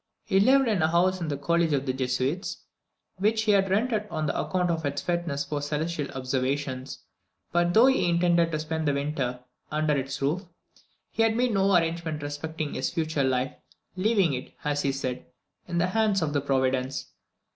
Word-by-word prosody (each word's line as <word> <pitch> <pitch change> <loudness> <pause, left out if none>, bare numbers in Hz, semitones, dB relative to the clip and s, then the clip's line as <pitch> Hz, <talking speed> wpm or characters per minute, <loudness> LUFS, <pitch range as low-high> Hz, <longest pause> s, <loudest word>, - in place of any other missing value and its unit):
He 195 - +3
lived 265 +5 +5
in 210 -6 +1
a 155 - +4
house 180 +3 +2
in 165 - -2
the 145 -2 -2
college 170 +2 +1
of 140 -1 0
the 130 - 0
Jesuits, 130 +6 -2 0.5
which 220 +3 +2
he 215 - +3
had 195 -1 +3
rented 215 +1 +1
on 155 -3 -1
account 180 -2 0
of 165 -1 -2
its 140 -1 -1
fitness 170 -5 -2
for 145 0 -3
celestial 150 +1 -2
observations; 130 0 -2 0.5
but, 175 0 +2
though 230 +3 +8
he 265 -9 +3
intended 170 -1 +3
to 155 - 0
spend 160 0 -2
the 145 - +2
winter 140 -4 -2 0.3
under 155 -1 +1
its 135 -1 -3
roof, 155 +8 -1 0.7
he - - -1
had 225 0 +3
made 245 -1 +2
no 195 -1 +3
arrangement 165 -2 -2
respecting 150 +1 -4
his - - -1
future 160 -4 -1
life, 130 0 0 0.4
leaving 190 -4 +2
it, 130 0 -6
as 145 -1 0
he 140 - +1
said, 130 -7 -4 0.4
in 175 - -2
the 170 - +3
hands 210 -2 +2
of 150 -2 -1
Providence. 130 0 0
160 Hz, 180 wpm, -27 LUFS, 140-185 Hz, 0.7 s, though